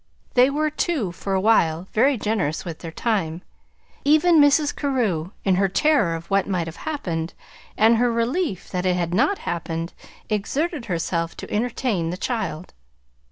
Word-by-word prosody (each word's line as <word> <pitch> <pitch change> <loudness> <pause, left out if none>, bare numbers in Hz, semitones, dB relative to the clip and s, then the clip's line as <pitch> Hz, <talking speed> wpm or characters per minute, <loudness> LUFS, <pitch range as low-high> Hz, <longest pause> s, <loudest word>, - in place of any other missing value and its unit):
They 250 +1 +5
were, 305 +2 0
too, 295 - -1
for 195 +3 -3
a - - +2
while, 185 -5 +2
very 260 +4 +3
generous 205 -9 -1
with 165 -3 -6
their 165 - -7
time. 180 -5 -1 0.6
Even 310 +2 +5
Mrs. 290 +1 +4
Carew, 225 - -1 0.2
in 190 -2 +3
her 195 +1 +3
terror 240 - +2
of 165 0 -7
what 195 -1 +2
might 180 -3 0
have 165 0 -8
happened, 170 - -3 0.4
and 225 +2 +5
her 245 +1 +2
relief 235 - -1
that 180 0 -1
it 180 - +2
had 175 -1 -1
not 390 - +2
happened, 165 0 -3 0.3
exerted 270 - -1
herself 170 -2 -2
to - - -7
entertain 220 -5 -1
the 180 - -4
child. 200 -7 -3
205 Hz, 160 wpm, -23 LUFS, 170-265 Hz, 0.6 s, They